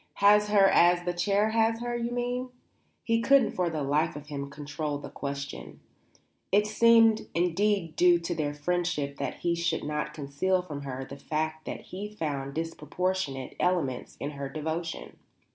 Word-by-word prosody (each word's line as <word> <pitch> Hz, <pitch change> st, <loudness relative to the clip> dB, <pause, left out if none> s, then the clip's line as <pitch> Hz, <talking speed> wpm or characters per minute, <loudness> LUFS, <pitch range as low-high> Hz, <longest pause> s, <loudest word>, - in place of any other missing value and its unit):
"Has 210 Hz, +1 st, +5 dB
her 205 Hz, -2 st, +5 dB
as 175 Hz, -1 st, +4 dB
the 175 Hz, -, 0 dB
chair 200 Hz, +5 st, +1 dB
has 225 Hz, 0 st, +2 dB
her, 240 Hz, 0 st, -3 dB
you 235 Hz, 0 st, -2 dB
mean?" 245 Hz, +1 st, -2 dB, 0.5 s
He 230 Hz, 0 st, +1 dB
couldn't 275 Hz, +1 st, +4 dB
for 180 Hz, -2 st, 0 dB
the 155 Hz, -3 st, -3 dB
life 150 Hz, +4 st, +1 dB
of 150 Hz, 0 st, -9 dB
him 140 Hz, -1 st, -5 dB
control 145 Hz, +1 st, -4 dB
the 145 Hz, -, -9 dB
question. 140 Hz, 0 st, -6 dB, 0.7 s
It 205 Hz, +1 st, +4 dB
seemed 225 Hz, 0 st, +5 dB
indeed 180 Hz, 0 st, +1 dB
due 175 Hz, -1 st, +5 dB
to 170 Hz, +1 st, -3 dB
their 145 Hz, -3 st, -2 dB
friendship 150 Hz, -3 st, -1 dB
that -, -, -4 dB
he 170 Hz, -, +1 dB
should 170 Hz, -1 st, -1 dB
not 150 Hz, 0 st, -3 dB
conceal 160 Hz, +6 st, 0 dB
from 150 Hz, -5 st, -6 dB
her 135 Hz, -1 st, -5 dB
the 140 Hz, -, -9 dB
fact 155 Hz, +1 st, -3 dB
that -, -, -5 dB
he 200 Hz, +3 st, -7 dB
found 145 Hz, -9 st, -4 dB
disproportionate 165 Hz, -2 st, -3 dB
elements 160 Hz, -9 st, -1 dB
in 145 Hz, -, -3 dB
her 140 Hz, -1 st, -5 dB
devotion. 160 Hz, +3 st, -4 dB
170 Hz, 165 wpm, -28 LUFS, 145-205 Hz, 0.7 s, Has